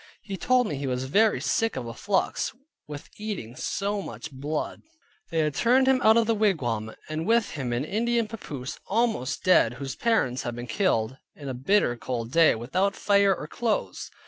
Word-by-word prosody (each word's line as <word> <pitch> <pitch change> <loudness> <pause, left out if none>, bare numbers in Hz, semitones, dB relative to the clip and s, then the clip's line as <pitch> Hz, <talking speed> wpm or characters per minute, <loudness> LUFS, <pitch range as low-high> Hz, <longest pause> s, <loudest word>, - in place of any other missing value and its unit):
He 200 - -5
told 250 +7 +2
me 150 -9 -3
he 140 0 -3
was 125 0 -1
very 210 +11 +3
sick 225 -1 0
of 130 - -4
a 115 - -6
flux, 195 - -1 0.3
with 150 +1 -9
eating 200 - -5
so 200 +8 -2
much 120 - -8
blood. 145 +3 -4 0.5
They 165 - -3
had 150 -1 0
turned 250 - +3
him 265 -1 +4
out 220 +1 +6
of 230 - +4
the 230 - +2
wigwam, 125 - 0
and 155 +3 -3
with 230 -1 +3
him 135 -5 -4
an 120 +4 -1
Indian 230 +5 0
papoose, 150 - -7
almost 220 - 0
dead 120 -10 +4
(whose 135 +1 -5
parents 210 - +1
had 120 -1 -4
been 120 0 -6
killed), 125 - 0 0.2
in 140 -2 -7
a - - -3
bitter 130 +1 +2
cold 120 -1 -4
day, 165 -2 +5
without 185 - 0
fire 200 -1 +3
or 150 - -7
clothes. 225 +5 -2
160 Hz, 190 wpm, -26 LUFS, 125-215 Hz, 0.5 s, out